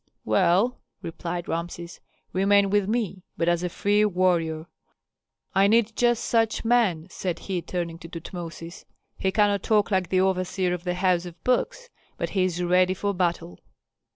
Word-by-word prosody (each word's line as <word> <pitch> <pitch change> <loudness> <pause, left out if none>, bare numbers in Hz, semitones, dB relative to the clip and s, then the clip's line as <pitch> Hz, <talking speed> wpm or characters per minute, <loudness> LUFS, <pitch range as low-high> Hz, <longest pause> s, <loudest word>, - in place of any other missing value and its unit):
"Well," 195 +7 +2 0.2
replied 170 +1 -5
Rameses, 170 0 -5 0.3
"remain 200 +1 +3
with 205 -1 +2
me, 215 -5 -1 0.2
but 170 - 0
as 175 0 +2
a 180 - -2
free 205 +4 +2
warrior. 175 -5 +1 0.9
I 195 +1 +4
need 225 0 +2
just 240 -1 +2
such 225 -1 +1
men," 220 -9 +2
said 180 -3 -3
he, 185 -3 -3
turning 170 -2 -4
to 165 - -10
Tutmosis. 170 0 -8 0.3
"He 190 - +1
cannot 205 -1 +2
talk 210 0 +2
like 185 -3 +1
the 185 -1 +2
overseer 185 -1 0
of 180 0 -5
the 180 0 -1
house 180 -1 +1
of 175 0 -13
books, 485 - -1 0.3
but - - -3
he 190 -2 +2
is 180 -1 -2
ready 180 +1 +3
for 200 +2 -1
battle." 175 - -2
185 Hz, 160 wpm, -25 LUFS, 175-205 Hz, 0.9 s, I